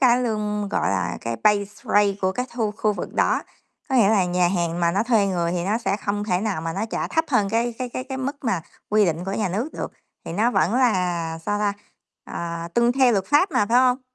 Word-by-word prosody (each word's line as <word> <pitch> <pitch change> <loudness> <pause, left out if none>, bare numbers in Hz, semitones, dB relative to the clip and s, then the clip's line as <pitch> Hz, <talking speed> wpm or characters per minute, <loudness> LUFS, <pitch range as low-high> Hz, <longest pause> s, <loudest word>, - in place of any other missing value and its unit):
cái 250 -1 +4
lương, 210 -3 -2
gọi - - 0
là, 90 -2 -1
cái 115 0 -3
pay 210 0 +1
rate 205 -1 +3
của 185 0 +2
cái 250 +5 -3
thu 220 -3 -1
khu 215 -1 +1
vực - - -6
đó, - - +2 0.5
có 265 - -1
nghĩa 210 -4 +5
là 200 -4 +3
nhà 180 0 +2
hàng 175 -2 -1
mà 170 0 +3
nó 200 - +1
thuê 225 -4 +3
người 175 -3 0
thì 175 -1 -2
nó 215 +4 0
sẽ 200 -4 -1
không 205 0 -2
thể 180 -3 0
nào 205 -7 -2
mà 165 0 -3
nó 200 +5 -2
trả - - -2
thấp 320 0 +1
hơn 215 -8 +2
cái 230 +1 0
cái 255 - -3
cái 255 +1 -5
cái 265 -1 -5
mức 275 +2 -3
mà 190 -7 0 0.3
quy 210 0 +4
định 170 0 -1
của 195 - -3
nhà 205 -1 -1
nước 215 - -2
được, - - -5 0.3
thì - - -6
nó 215 +7 +2
vẫn 185 -1 +1
là, 180 -9 +1
sao 205 +5 -2
ta, 205 -1 +1 0.5
ờ, 170 0 -5
tuân 235 +1 +3
theo 260 -2 +4
luật 195 -3 0
pháp 295 +7 +3
mà, 250 -8 +2
phải 235 +3 +4
hông? 255 +1 +3
205 Hz, 250 wpm, -23 LUFS, 180-235 Hz, 0.5 s, nghĩa